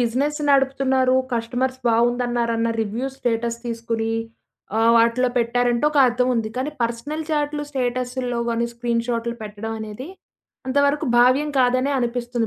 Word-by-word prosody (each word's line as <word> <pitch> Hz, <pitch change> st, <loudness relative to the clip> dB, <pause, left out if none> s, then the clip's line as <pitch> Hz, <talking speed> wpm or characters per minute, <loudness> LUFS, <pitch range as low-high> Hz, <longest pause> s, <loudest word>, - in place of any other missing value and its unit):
Business 265 Hz, +6 st, 0 dB
నడుపుతున్నారు 265 Hz, -1 st, +3 dB, 0.2 s
customers 245 Hz, +3 st, -2 dB
బావుందన్నారన్న 235 Hz, 0 st, +1 dB
review 225 Hz, +5 st, -2 dB
status 235 Hz, -1 st, -1 dB
తీసుకొని 230 Hz, -1 st, -2 dB, 0.7 s
ఆహ్, 225 Hz, +1 st, +4 dB
వాటిలో 235 Hz, +2 st, +3 dB
పెట్టారంటే 240 Hz, +2 st, +1 dB
ఒక 300 Hz, -1 st, 0 dB
అర్థం 250 Hz, +1 st, +1 dB
ఉంది. 225 Hz, -2 st, -1 dB
కానీ, 265 Hz, +4 st, -1 dB
పర్సనల్ 240 Hz, +7 st, -3 dB
చాట్లు 295 Hz, -1 st, -1 dB
స్టేటసుల్లో 250 Hz, -1 st, -2 dB
గానీ 235 Hz, 0 st, 0 dB
స్క్రీన్ 235 Hz, -1 st, -1 dB
షాట్‌లు 235 Hz, 0 st, -1 dB
పెట్టడం 215 Hz, +1 st, -6 dB
అనేది 220 Hz, +7 st, -7 dB, 0.6 s
అంతవరకు 285 Hz, +2 st, +2 dB
భావ్యం 255 Hz, +5 st, +4 dB
కాదనె 255 Hz, +2 st, +2 dB
అనిపిస్తుంది 240 Hz, -1 st, -1 dB
245 Hz, 125 wpm, -22 LUFS, 230-260 Hz, 0.7 s, ఆహ్